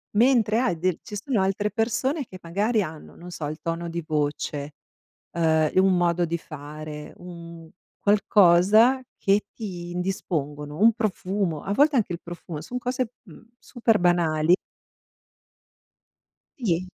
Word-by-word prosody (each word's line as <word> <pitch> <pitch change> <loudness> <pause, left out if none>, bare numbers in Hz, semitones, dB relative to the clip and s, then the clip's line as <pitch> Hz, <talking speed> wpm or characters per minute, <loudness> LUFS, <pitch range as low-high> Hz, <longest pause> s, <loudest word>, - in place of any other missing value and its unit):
Mentre 230 -2 +4
hai 245 -9 +1
dei 185 0 0
ci 210 - -8
sono 225 0 -1
altre 195 +2 0
persone, 245 +7 -1
che 185 -4 -12
magari 205 +7 0
hanno, 155 -4 -7
non 175 +1 -11
so, 165 -3 -5
il 155 +2 -5
tono 170 +1 -3
di 170 0 -4
voce, 145 -1 -2 0.6
uhm, 160 -2 +2
un 185 0 +4
modo 175 0 +2
di 170 0 -1
fare, 150 0 -9
un 170 -2 -11 0.3
qualcosa, 205 +4 +5 0.2
che 200 +1 +2
ti 180 -6 -6
indispongono. 150 -5 -3
Un 225 +2 +6
profumo 195 -6 -2
a 200 - -2
volte 290 +4 +4
anche 205 -6 0
il 170 - -6
profumo, 170 -2 -8
son 245 +10 -5
cose, 250 -1 -2
mhmm, 215 +3 -16
super 230 -3 +1
banali 170 -2 +3 2.1
Gli 180 -5 0
180 Hz, 140 wpm, -25 LUFS, 165-215 Hz, 2.1 s, Un